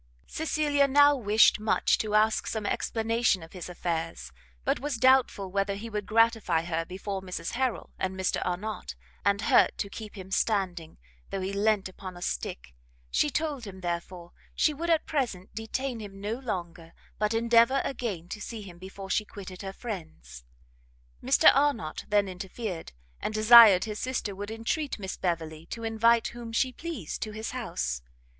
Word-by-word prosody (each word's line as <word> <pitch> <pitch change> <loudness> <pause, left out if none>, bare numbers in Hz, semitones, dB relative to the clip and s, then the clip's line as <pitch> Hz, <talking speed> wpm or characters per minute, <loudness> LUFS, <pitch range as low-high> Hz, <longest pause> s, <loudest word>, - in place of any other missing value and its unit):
Cecilia 295 -3 +1
now 285 +1 +6
wished 215 -4 +4
much 215 +1 +2
to 215 -1 -1
ask 215 +1 +3
some 220 -2 -3
explanation 225 -4 0
of 160 - -13
his 180 -2 -7
affairs, 165 - -3 0.3
but - - +1
was 285 -2 -3
doubtful 250 -6 +3
whether 200 +1 0
he 225 +3 -7
would 210 -1 -3
gratify 225 -7 +3
her 165 -1 -2
before 190 +2 -5
Mrs 180 -3 -5
Harrel 255 -1 -2
and 190 0 -2
Mr 190 - 0
Arnott, 180 - -4 0.3
and 200 +1 +2
hurt - - +4
to 200 - -3
keep 215 -1 -8
him 190 0 -9
standing, 185 -6 -1 0.3
though 195 - -3
he 190 +1 -3
leant 205 -1 +2
upon 185 -1 -9
a - - -11
stick; - - -4 0.4
she 295 - +2
told 290 -5 -2
him, 190 -1 -9
therefore, 175 0 -4 0.2
she 305 - +3
would 335 +4 -4
at 325 -2 +3
present 230 - -2
detain 240 +3 -3
him 200 -2 -9
no 205 +2 -2
longer, 175 -9 -5 0.3
but 210 +1 +1
endeavour 235 +3 +4
again 215 -10 -4
to 210 - -6
see 220 -1 -6
him 175 -3 -12
before 190 +1 -8
she 215 - +2
quitted 190 -3 -10
her 195 -1 -5
friends. 160 - -8 0.8
Mr - - +6
Arnott 275 - 0
then 205 -1 +2
interfered, 190 0 -6 0.3
and 215 - -3
desired 215 -3 +9
his 215 -1 -5
sister 255 -5 -2
would 205 +2 -6
entreat 230 +7 -2
Miss 190 -3 -5
Beverley 165 -2 -3
to 230 - -6
invite 225 +1 +3
whom 235 -1 -8
she 255 +3 +1
pleased 305 - -6
to 215 - -4
his 220 +1 -5
house. 170 - -3
210 Hz, 170 wpm, -28 LUFS, 185-230 Hz, 0.8 s, desired